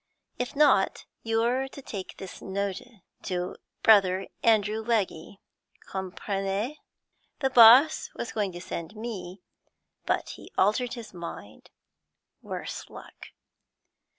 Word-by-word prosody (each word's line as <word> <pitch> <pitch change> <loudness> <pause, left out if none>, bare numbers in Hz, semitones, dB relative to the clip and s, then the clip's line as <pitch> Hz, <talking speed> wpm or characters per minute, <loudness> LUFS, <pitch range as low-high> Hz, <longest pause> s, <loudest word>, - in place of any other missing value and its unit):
'If 250 +3 -3
not, 280 -10 +3 0.2
you're 235 +4 +1
to 270 - -11
takee 200 -8 -7
this 190 - -9
notee 200 +3 -4 0.2
to 180 -2 -3 0.3
Brother 195 -3 +5 0.2
Andrew 220 -1 +2
Leggee, 200 -5 -1 0.5
comprenez? 195 +6 -3 0.6
The 265 -1 +1
boss 250 +6 +7
was 235 - -5
going 205 -3 -1
to 175 - -7
send 170 +2 -6
me, 200 -5 -7 0.6
but - - 0
he - - -10
altered 240 +6 +2
his 230 -4 -9
mind, 170 - -9 0.7
worse - - -6
luck.' - - -12
210 Hz, 110 wpm, -27 LUFS, 190-235 Hz, 0.7 s, boss